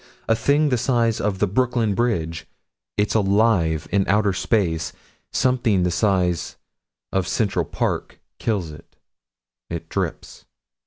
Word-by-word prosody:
A 115 - +4
thing 145 +5 +2
the 125 -3 +1
size 120 -2 +1
of 100 -2 0
the 105 - +2
Brooklyn 115 +1 +1
Bridge. 85 -8 -1 0.5
It's 105 0 +1
alive 100 -7 +2
in 100 -1 +3
outer 105 -1 +3
space 85 -6 0 0.4
something 120 -7 +2
the 90 - +1
size 90 -2 +1 0.6
of 95 -2 0
Central 95 -6 0
Park - - -3 0.2
kills 95 -8 -1
it 75 +2 -14 0.7
It 85 -1 -6
drips. - - -4
100 Hz, 125 wpm, -22 LUFS, 90-115 Hz, 0.7 s, A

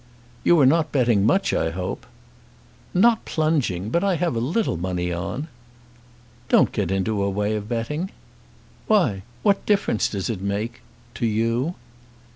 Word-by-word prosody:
"You 175 - +5
are 140 - +6
not 155 +3 +3
betting 120 -7 +3
much, 195 +11 +2
I 80 - +1
hope." 90 +6 -5 0.8
"Not 225 +5 +4
plunging. 135 - 0
But 170 +6 +1
I 195 -2 +2
have 165 -4 -1
a - - 0
little 160 - 0
money 90 0 -2
on." 110 - -4 1.0
"Don't - - +4
get - - -1
into 95 +2 0
a 100 - +1
way 105 +2 -1
of 105 0 -5
betting." 150 +10 -2 0.8
"Why: 170 - +2 0.2
what 200 -1 +3
difference 200 - +2
does 100 -3 -3
it 110 -6 -3
make, 105 +4 -3 0.3
to 115 - -1
you?" 115 +9 0
115 Hz, 150 wpm, -23 LUFS, 100-165 Hz, 1.0 s, are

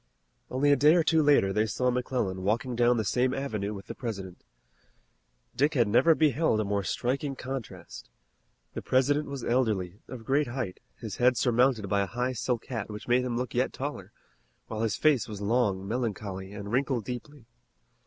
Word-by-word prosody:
Only 145 +3 +2
a - - +6
day 150 +3 +5
or 170 - +4
two 160 0 +3
later 140 -10 +4
they 110 +2 +1
saw 125 +4 0
McClellan 120 -7 -2
walking 115 +6 -1
down 120 +1 +3
the 110 - -1
same 130 +5 +1
avenue 110 -7 -3
with 100 -2 -8
the - - -6
President. 95 -7 -6 1.1
Dick 150 +3 +2
had 120 -4 +3
never 155 +10 +5
beheld 155 -6 +2
a - - +1
more 100 0 -1
striking 135 +7 -2
contrast. 125 -10 -7 0.6
The - - -5
President 145 +3 +2
was 140 -3 -6
elderly, 105 -7 0
of 120 -3 -9
great 140 +4 +2
height, 120 -6 -4 0.2
his 110 -3 -7
head 125 0 +3
surmounted 125 -3 +2
by 100 +1 +1
a 100 - -1
high 125 +4 -2
silk 120 0 -2
hat 115 -6 -4
which 105 0 -8
made 125 +1 +3
him 120 -2 -2
look 125 -1 -3
yet - - 0
taller, - - -5 0.5
while 110 -1 -5
his 110 -4 0
face 150 -7 +3
was 105 -2 -7
long, 100 -3 0
melancholy, 100 -5 -3
and 100 0 -7
wrinkled 130 -3 0
deeply. 125 +1 -7
120 Hz, 185 wpm, -28 LUFS, 105-130 Hz, 1.1 s, a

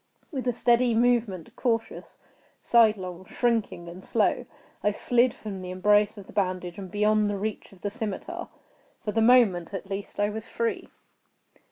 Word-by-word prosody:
With 265 -4 -3
a 245 - +2
steady 240 0 +3
movement—cautious, 230 -1 0 0.4
sidelong, 200 -6 +2
shrinking, 225 -7 -1
and 175 +2 -9
slow—I 210 - -1
slid 245 +4 +2
from 205 -4 -7
the 180 - -6
embrace 205 +3 +3
of 200 - -9
the - - -14
bandage 185 -2 -2
and 190 -2 -7
beyond 210 +1 +2
the 205 - -2
reach 215 +2 -4
of 195 - -18
the 205 - -2
scimitar. 220 -3 -5 0.6
For 210 - 0
the 225 - +1
moment, 220 -7 +4
at 195 +1 -7
least, 195 +1 -5
I 205 0 +2
was 220 +1 -6
free. 230 0 -2
210 Hz, 155 wpm, -27 LUFS, 190-230 Hz, 0.6 s, moment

